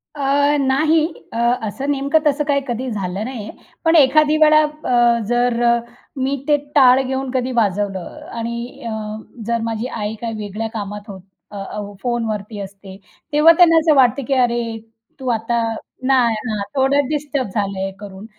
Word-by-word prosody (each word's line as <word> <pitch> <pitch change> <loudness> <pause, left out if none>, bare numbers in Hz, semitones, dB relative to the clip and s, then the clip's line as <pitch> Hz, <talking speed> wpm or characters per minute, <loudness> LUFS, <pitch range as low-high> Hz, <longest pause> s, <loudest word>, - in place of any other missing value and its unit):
अ, 285 +1 +2
नाही. 305 +4 +2 0.3
अ, - - -4 0.3
असं 270 +7 -4
नेमकं 280 +3 +2
तसं 295 +1 +1
काही 280 -1 +2
कधी 250 +1 -3
झालं 195 -1 -3
नाही 250 -4 -6
आहे. - - -12 0.3
पण 325 +1 +4
एखादी 305 +1 +5
वेळा 305 0 +6
अ, 245 -6 +2
जर 240 0 +1 0.6
मी 265 +2 0
ते, 295 - +5 0.2
टाळ 260 -2 +6
घेऊन 265 0 -3
कधी 255 0 -1
वाजवलं 205 - -2
आणि 235 +2 -5
अ, - - -4 0.6
जर 235 -1 0
माझी 225 +1 -3
आई 215 -3 -4
काय 230 -1 -3
वेगळ्या 210 +1 -4
कामात 210 -1 -5
होत 190 -2 -9 0.3
अ, 205 - -8 0.2
हो 205 -1 -6
फोनवरती 220 -4 -3
असते, 195 -1 -9 0.4
तेव्हा 305 +3 +7
त्यांना 335 -2 +6
असं 315 -1 +3
वाटतं, 260 0 +4
की 275 - +1
अरे! 235 -3 0 0.4
तू 260 - -6
आता 235 0 0 0.5
नाही, 250 -4 +3
हां, 210 -2 -2
थोडं 275 +1 +2
डिस्टर्ब 290 -3 -2
झालंय 195 -2 -2
करून. 200 0 -10
245 Hz, 160 wpm, -19 LUFS, 215-280 Hz, 0.6 s, तेव्हा